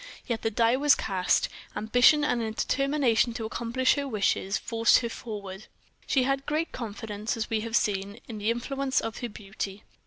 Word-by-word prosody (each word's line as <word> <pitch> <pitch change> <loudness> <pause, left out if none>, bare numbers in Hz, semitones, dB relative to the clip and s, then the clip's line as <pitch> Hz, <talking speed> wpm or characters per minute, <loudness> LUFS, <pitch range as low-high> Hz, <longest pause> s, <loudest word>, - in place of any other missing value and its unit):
Yet 235 -3 -2
the 225 - 0
die 230 +2 +3
was 290 +1 +5
cast; 185 -3 +1 0.3
ambition 245 +8 +4
and 245 -5 +1
a 225 - -2
determination 255 -1 +1
to 225 - -3
accomplish 235 +3 +1
her 285 -1 -2
wishes 200 -3 0
forced 230 0 +3
her 235 - -2
forward. 205 -4 -7 0.4
She 265 - +3
had 275 +1 -1
great 310 +3 -1
confidence, 220 -2 -4
as 225 - -3
we 220 - +2
have 230 +1 -3
seen, 200 0 0
in 220 -3 -6
the 210 +2 0
influence 265 +3 0
of 225 -1 -5
her 240 - -4
beauty. 200 -1 -6
230 Hz, 180 wpm, -27 LUFS, 215-260 Hz, 0.4 s, was